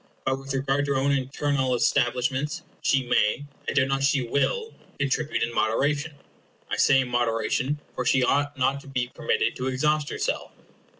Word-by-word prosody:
But 130 0 0
with 135 0 -8
regard 135 +1 +1
to 140 - +1
her - - +2
own 135 +2 +2
internal 135 -1 0
establishments, 125 +4 0 0.2
she 135 -1 +2
may, 120 +3 +1 0.2
I - - -2
doubt 135 -2 +3
not 135 0 0
she 140 -1 +2
will, 445 - 0 0.3
c 140 - +2
ontribute 135 -4 0
in 120 +1 -2
moderation. 145 +8 0 0.6
I - - 0
say 135 0 +5
in 130 - -3
moderation, 120 +4 0
for 125 - -2
she 130 +1 +3
ought 145 +2 +1
not 135 +1 +1
to 140 - -16
be 130 -2 -2
permitted 155 - 0
to 130 - -2
exhaust 150 +3 +1
herself. - - -3
135 Hz, 180 wpm, -25 LUFS, 125-145 Hz, 0.6 s, say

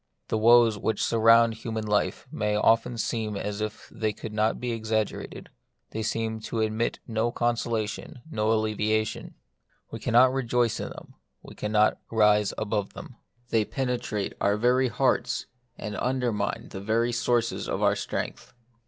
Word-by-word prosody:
The - - +1
woes 115 -1 +6
which 110 - -1
sur 115 - +1
round 115 +1 +6
human 110 0 -4
life 105 -1 0
often 110 +3 +2
seem 110 -2 -2
as 105 +1 -4
if 110 0 -5
they 110 -1 -1
could 110 +1 -8
not 110 +1 +1
be 125 -1 -2
exaggerated; 110 -2 -3 0.4
they 110 - -3
seem 110 0 -2
to 110 +1 -3
admit 110 +1 0
of - - -18
no 115 +1 0
consolation, 120 -1 -2
no 110 -2 +1
alleviation. 110 0 0 0.6
We 115 - -6
cannot 125 +3 +4
rejoice 120 -3 +1
in - - -4
them; - - -11 0.3
we - - -11
cannot 105 0 +2
rise 105 -2 +4
above 105 -2 -2
them. 120 - -10 0.3
They 110 -1 +3
penetrate 120 -2 -2
our 100 +1 +2
very 125 +3 +3
hearts, 115 - 0 0.3
and 105 -1 -5
under 125 -1 0
mine 105 - -3
the 95 - -6
very 115 +4 +1
sources 115 0 0
of - - -1
our - - +4
strength. - - -5
110 Hz, 155 wpm, -27 LUFS, 105-120 Hz, 0.6 s, woes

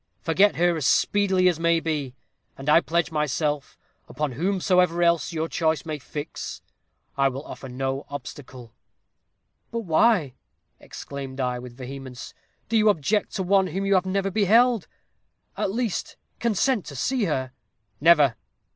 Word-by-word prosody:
Forget 195 +5 +3
her 175 0 +2
as 145 -5 0
speedily 190 +5 +3
as 175 -3 +1
may 170 0 +3
be, 150 -6 -3 0.4
and 135 - -9
I 160 +3 +6
pledge 170 -1 0
myself, 150 -1 -1 0.3
upon 150 +1 -2
whomsoever 180 +2 +1
else 170 -1 +2
your 160 -1 -2
choice 160 -4 0
may 155 -2 -4
fix, 145 +3 -7 0.6
I 135 - +5
will 135 +3 -7
offer 130 - -9
no 135 +2 -3
obstacle.' 130 -3 -9 1.0
"'But 230 0 -3
why,' 170 - +2 0.5
exclaimed 135 -1 -8
I, 125 -1 -1
with 125 -1 -11
vehemence, 130 -1 -8 0.3
'do 225 - +1
you 215 0 +5
object 205 +3 0
to 190 - -1
one 190 +1 +3
whom 190 +3 -3
you 200 - +2
have 190 -1 +2
never 195 +1 0
beheld? 220 +3 +3 0.7
At - - -1
least, 230 -2 -3 0.2
consent 235 0 +1
to 140 - -8
see 245 - 0
her.' 130 -6 -2 0.5
"'Never!' 150 -6 +5
165 Hz, 145 wpm, -25 LUFS, 135-195 Hz, 1.0 s, I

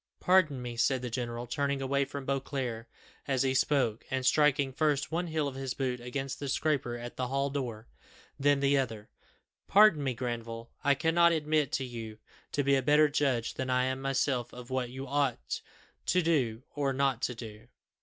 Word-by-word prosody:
"Pardon 165 -9 +3
me," 120 -1 -6
said 125 +2 +2
the 125 - -4
general, 120 0 -3
turning 140 +3 -1
away 140 +1 +1
from 140 0 -7
Beauclerc 130 -4 -3 0.4
as 135 -2 +1
he 130 -1 +1
spoke, 130 -5 +1
and 130 -1 -1
striking 140 -1 +3
first 150 0 +1
one 175 +2 -1
heel 155 -2 -1
of 140 - -4
his 135 -1 -4
boot 125 -2 -2
against 135 +2 -4
the 140 - -4
scraper 135 -4 0
at 120 0 -8
the 130 - -1
hall 140 +2 -1
door, 120 -6 -4 0.5
then 140 0 +3
the 140 0 +3
other 110 -5 -4 0.6
"pardon 200 -7 +6
me, 130 -3 -1
Granville, 115 -1 -5
I 140 0 +4
cannot 170 +3 +4
admit 155 -3 +1
you 115 -4 -6 0.3
to 145 - 0
be 140 +1 +3
a 135 - +2
better 150 +3 +5
judge 135 -5 0
than 130 -1 -4
I 125 0 +2
am 130 +1 -1
myself 135 -2 0
of 125 +1 -10
what 130 -2 -1
I 130 - -10
ought 140 - -1 0.5
to 180 - +3
do 130 -8 +1
or 140 -2 0
not 135 -3 +1
to 125 - -1
do." 110 0 -10
135 Hz, 185 wpm, -30 LUFS, 125-145 Hz, 0.6 s, pardon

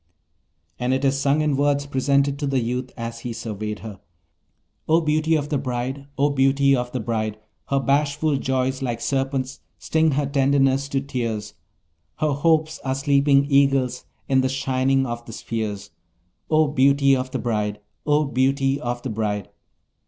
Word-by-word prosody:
And 125 +1 +1
it 135 +1 -1
is 135 0 +2
sung 140 +2 +2
in 150 -2 +1
words 140 0 +1
present 140 +1 +1
to 145 - -1
the 135 -1 +1
youth 125 +2 -2
as 115 0 -5
he 120 0 -5
surveyed 105 -1 -5
her: 105 -4 -8 0.9
O 160 +1 +5
beauty 155 0 +1
of 145 -1 -1
the 145 - 0
bride! 130 +1 -4
O 145 +1 +2
beauty 135 0 +3
of 125 -1 -3
the 130 - -2
bride! 110 -2 -2 0.3
Her 140 - +1
bashful 145 +2 +1
joys 130 0 -1
like 120 -3 -2
serpents 135 -1 -2 0.2
sting 160 -1 +1
her 145 +1 +1
tenderness 135 0 +2
to 135 -1 0
tears: 115 -6 -3 0.6
Her 155 -1 0
hopes 160 +2 +1
are 130 0 -1
sleeping 140 0 +3
eagles 135 -3 +2 0.2
in 130 -1 +3
the 130 - 0
shining 135 0 +1
of 120 -1 -5
the 115 - -8
spheres; 105 -4 -4 0.6
O 155 0 +4
beauty 140 0 +4
of 130 0 -3
the 130 - -3
bride! 105 -4 -2 0.3
O 150 +1 +3
beauty 135 +1 +1
of 120 0 -3
the 130 - -3
bride! 105 -3 -2
135 Hz, 165 wpm, -23 LUFS, 125-140 Hz, 0.9 s, O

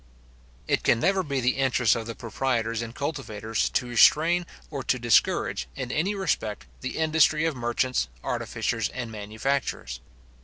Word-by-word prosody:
It - - +1
can 115 - +3
never 190 +6 +2
be 140 -6 -2
the 125 +2 +1
interest 130 -4 +3
of 115 -1 -4
the 115 - -5
proprietors 115 -2 -1
and 115 +1 -6
cultivators, 115 -7 -2
to 130 - 0
restrain 160 +8 +4 0.2
or 140 -3 -3
to 125 - +1
discourage, 115 - +2
in 125 - -4
any 180 +9 0
respect, 145 - -2
the 130 - -5
industry 160 0 +3
of 165 -3 0
merchants, 120 - 0 0.2
artificers, - - -2
and 120 -3 -6
manufacturers. 110 - -3
125 Hz, 150 wpm, -26 LUFS, 115-150 Hz, 0.2 s, restrain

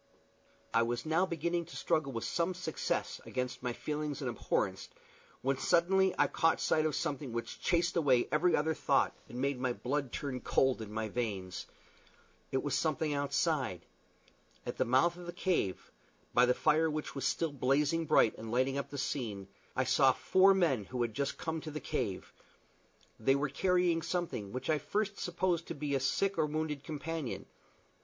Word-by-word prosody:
I 115 - +5
was 120 +2 -1
now 165 +4 +2
beginning 170 +1 -1
to 170 - -12
struggle 145 -3 0
with 115 -3 -4
some 175 +2 0
success 175 -3 -2
against 125 -1 -3
my 125 -1 -1
feelings 150 +2 -3
of - - -1
abhorrence, - - -1 0.5
when 135 0 +1
suddenly 190 +2 +3
I - - +5
caught 165 -1 +2
sight 155 0 +2
of 150 - -2
something 145 -5 -2
which 115 0 -5
chased 175 -1 +1
away 135 -7 +3
every 180 -2 +3
other 160 +2 +1
thought, - - +2
and 120 - -8
made 135 0 0
my 125 -1 0
blood 135 +1 -2
turn 135 -3 -3
cold 130 -3 +2
in 105 -1 -7
my 110 0 -2
veins. 100 -5 -3 0.8
It 130 - 0
was 145 - -2
something 155 +1 0
outside. 140 - 0 0.8
At - - -4
the - - +3
mouth 135 +8 +3
of 175 -1 -9
the - - -3
cave 175 - -1 0.4
by 125 +1 +5
the 125 - +3
fire 160 +1 +3
which 155 0 -3
was 135 - -4
still 165 -2 0
blazing 145 +4 +1
bright, 110 - +4
and 110 0 -6
lighting 130 +3 +1
up 140 - -5
the 140 - -6
scene 110 -9 -3 0.3
I - - +2
saw - - +4
four 190 +1 +5
men 145 - +2
who 125 +4 -2
had 115 -2 -2
just 140 +2 -2
come 160 -1 -3
to 155 - -6
the 155 0 -5
cave: 105 -8 -3 0.9
they 135 +5 +3
were 140 +1 0
carrying 180 +2 +2
something 165 - -3
which 130 - -5
I 155 - +3
at - - -8
first 205 -1 -1
supposed 175 -1 0
to - - -5
be 145 0 -3
a 135 - +2
sick 190 +8 0
or 155 - +3
wounded 150 -2 -2
companion. 155 -3 -4
145 Hz, 185 wpm, -33 LUFS, 125-165 Hz, 0.9 s, I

